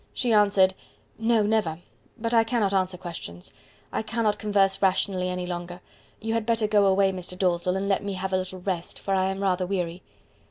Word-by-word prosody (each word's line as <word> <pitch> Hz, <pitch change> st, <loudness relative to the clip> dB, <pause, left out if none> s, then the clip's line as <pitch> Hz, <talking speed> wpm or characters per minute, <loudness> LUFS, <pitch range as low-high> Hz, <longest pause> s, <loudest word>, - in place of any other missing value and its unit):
She 240 Hz, -2 st, +1 dB
answered 200 Hz, -3 st, +5 dB, 0.5 s
"No, 225 Hz, -1 st, +3 dB
never; 205 Hz, -7 st, +1 dB, 0.4 s
but 230 Hz, 0 st, -2 dB
I 225 Hz, -1 st, +6 dB
cannot 225 Hz, -4 st, 0 dB
answer 185 Hz, -1 st, +1 dB
questions. 160 Hz, -, -8 dB, 0.4 s
I -, -, -1 dB
cannot 220 Hz, -1 st, 0 dB
converse 200 Hz, -2 st, +2 dB
rationally 185 Hz, -1 st, +1 dB
any 180 Hz, 0 st, -3 dB
longer. 175 Hz, 0 st, -5 dB, 0.4 s
You 225 Hz, +1 st, -2 dB
had 230 Hz, -1 st, 0 dB
better 230 Hz, -2 st, +2 dB
go 210 Hz, -1 st, +4 dB
away, 195 Hz, 0 st, +4 dB
Mr. 180 Hz, -1 st, -6 dB
Dalzell, 180 Hz, 0 st, +1 dB
and 195 Hz, +1 st, -2 dB
let 195 Hz, 0 st, +1 dB
me 200 Hz, -1 st, -3 dB
have 190 Hz, 0 st, -4 dB
a -, -, +4 dB
little 185 Hz, 0 st, -5 dB
rest, 180 Hz, -2 st, -3 dB
for 195 Hz, -, -3 dB
I 190 Hz, -1 st, +2 dB
am 195 Hz, +1 st, -2 dB
rather 185 Hz, -1 st, +1 dB
weary." 180 Hz, -2 st, -2 dB
195 Hz, 195 wpm, -26 LUFS, 180-210 Hz, 0.5 s, I